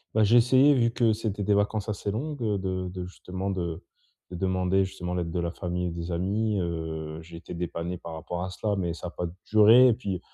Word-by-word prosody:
Bah, 110 - +5
j'ai 115 +4 +5
essayé, 130 +4 +6
vu 115 -3 +3
que 115 -1 +2
c'était 105 -2 -3
des 105 - +2
vacances 105 +1 +1
assez 105 -1 -3
longues, 140 +7 -3
heu, 105 -3 +1
de 95 -1 -2
de 90 -1 -5
justement, 95 +1 -5
de 85 -2 -3 0.5
de - - -5
demander, 95 +1 +1
justement, 90 -2 -5
l'aide 85 -2 -2
de 90 - -2
la 85 0 -1
famille 90 0 -3
et - - -1
des 85 +1 -5
amis, 100 +4 0
heu, 80 -2 -4
j'ai 85 0 -11
été 85 - -9
dépanné 85 +1 -3
par 85 - -8
rapport 85 +2 -4
à 95 - -4
cela, 105 +2 -1
mais 85 -4 -1
ça 85 - -6
a - - -4
pas 90 - -4 0.2
duré 110 +4 +7
et 120 - +4
puis 100 -6 -4
95 Hz, 230 wpm, -27 LUFS, 85-105 Hz, 0.5 s, duré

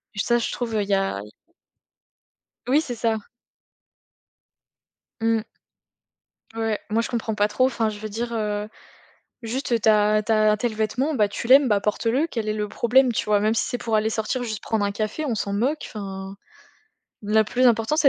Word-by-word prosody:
Et - - -5
ça 240 +3 +2
je 230 - -2
trouve, 230 -3 -3
heu, 210 - +2
il 200 - -8
y - - +2
a 195 - 0
i 105 - -13 1.4
Oui 285 +4 +4
c'est 250 -6 -5
ça. 225 -1 0 2.0
Mmh. 225 -1 +1 1.1
Ouais, 225 -2 -1
moi 220 +2 +2
je - - -4
comprends 225 -2 -2
pas 205 0 +2
trop, 215 +5 +2
enfin 230 -4 0
je 210 -1 -7
veux 215 0 -6
dire, 235 +3 -4
heu, 210 -2 -2 0.8
juste, 250 +5 -4
heu, 235 - +3
tu 220 - +1
as 210 0 +4
tu 225 - 0
as 215 -1 +4
tel 230 +1 -2
vêtement, 235 +8 -1
bah, 210 -5 +2
tu 205 - -5
l'aimes, 265 +2 +7
bah, 205 -2 +2
porte 210 +3 -2
le. 260 +8 +2
Quel 225 -9 -4
est - - +1
le 210 -1 -2
problème? 245 +4 +3
Tu - - -1
vois 210 -1 +3
même 215 +2 +1
si 225 - +1
c'est 245 - -3
pour 230 -2 -2
aller 215 +1 +2
sortir 225 +3 -2
juste 220 -4 -4
prendre 220 -2 0
un 200 - 0
café 215 +8 -3
on 245 -6 -1
s'en 200 -1 -2
moque 255 +10 0
enfin. 195 -2 -7 0.9
La 215 +1 +3
plus 250 +4 +2
important 230 +4 +2
c'est 310 -3 +5
220 Hz, 205 wpm, -23 LUFS, 210-240 Hz, 2.0 s, l'aimes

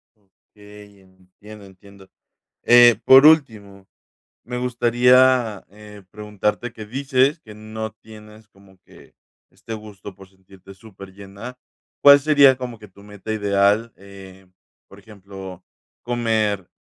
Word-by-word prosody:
Okey, 105 0 -20
entiendo, 95 +3 -18
entiendo. 95 0 -19 0.5
Eh, 120 -2 +5
por 135 +2 +7
último, 105 -11 +1 0.6
me 125 +1 -7
gustaría, 125 -2 +1
eh, 105 0 -15
preguntarte 105 +2 -5
que 110 -2 -11
dices 135 +4 -1
que 110 -6 -15
no 110 0 -8
tienes 110 0 -17
como 95 -2 -24
que - - -20 0.4
este 115 - -11
gusto 105 -3 -12
por 95 0 -17
sentirte 95 0 -19
superllena, 100 +3 -13 0.4
¿cuál 140 0 +7
sería 140 -3 +4
como 125 -3 -9
que 105 -1 -16
tu 100 +2 -21
meta 105 +1 -9
ideal?, 105 +2 0
eh, 95 -1 -16 0.4
por 100 - -17
ejemplo, 95 -3 -13 0.4
comer 110 -5 -3
105 Hz, 120 wpm, -20 LUFS, 100-120 Hz, 0.6 s, por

